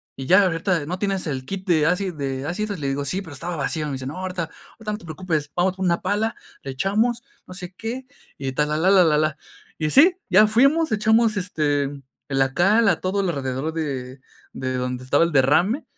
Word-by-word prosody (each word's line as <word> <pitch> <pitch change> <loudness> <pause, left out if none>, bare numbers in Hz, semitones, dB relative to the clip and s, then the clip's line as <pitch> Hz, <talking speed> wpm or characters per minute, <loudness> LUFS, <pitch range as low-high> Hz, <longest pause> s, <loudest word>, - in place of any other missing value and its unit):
y 135 - -6
ya 190 +5 +6
ahorita 170 -2 0
"¿No 180 +3 -4
tienes 195 -2 -1
el 130 -3 -3
kit 190 +2 -5
de 160 -4 +3
acid 180 +1 0
de 135 -2 -4
ácidos?" 205 +4 -3
Le 140 -2 -2
digo: 140 +1 -2
"Sí, 185 +8 -2
pero 160 -5 -10
estaba 170 +5 -5
vacío". 155 +1 -2
Me 145 - -4
dice: 130 -1 -5
"No, 140 +6 -6
ahorita 185 -2 -3 0.3
ahorita 220 -1 -6
no 210 - -3
te - - -14
preocupes, 160 -3 -3
vamos 180 +1 +1
por 190 - -2
una 170 -1 +1
pala, 210 +4 -1 0.3
le 135 - -6
echamos, 220 - 0 0.2
no - - -9
sé 180 0 -7
qué 235 +6 -5 0.3
y 135 -1 -3
tal, 150 +3 0
la, 150 - 0
la, 180 +5 +3
la, 190 -2 +7
la, 150 -2 +3
la. 155 -1 0 0.4
Y 155 -1 0
sí, 345 - +6
ya 195 +3 +7
fuimos. 275 +8 +3
Echamos, 220 0 +3
este, 150 -6 0
eh, 135 - -4 0.4
la 135 -1 +1
cal 205 +7 +4
a - - +1
todo 195 +2 0
lo 180 - 0
alrededor 135 +2 -3
de 135 -5 -4 0.3
de 130 -1 -3
donde 125 0 -3
estaba 145 +5 +3
el 170 - 0
derrame. 155 - +3
175 Hz, 225 wpm, -23 LUFS, 145-200 Hz, 0.4 s, la